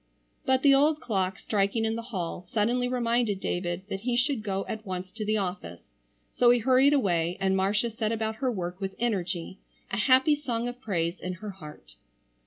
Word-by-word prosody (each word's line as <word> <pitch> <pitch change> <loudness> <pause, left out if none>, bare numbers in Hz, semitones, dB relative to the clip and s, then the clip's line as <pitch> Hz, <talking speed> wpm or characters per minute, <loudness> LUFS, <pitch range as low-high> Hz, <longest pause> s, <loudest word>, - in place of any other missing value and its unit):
But 260 0 +3
the 280 -2 +7
old 295 +3 +4
clock 190 -7 -1
striking 205 +2 0
in 220 0 0
the 230 - -3
hall 190 -8 -4
suddenly 230 +7 0
reminded 235 -4 0
David 175 -1 -2
that 195 - -3
he 240 +3 -1
should 255 -1 +1
go 195 -2 -2
at 220 0 -5
once 185 -2 -5
to 220 - -5
the 215 +1 +1
office, 180 - -5 0.4
so 240 - +4
he 245 - +6
hurried 260 +4 +4
away 175 - +1
and 190 0 +2
Marcia 205 +5 +1
set 220 0 -2
about 220 -1 -2
her 255 +1 0
work 180 -2 -5
with 195 0 -3
energy, 190 -6 -2 0.3
a 195 - -1
happy 260 +6 +5
song 245 -5 -2
of 245 +1 -7
praise 175 -6 -1
in 185 - -4
her 205 +3 -7
heart. 150 - -13
215 Hz, 195 wpm, -28 LUFS, 185-245 Hz, 0.4 s, the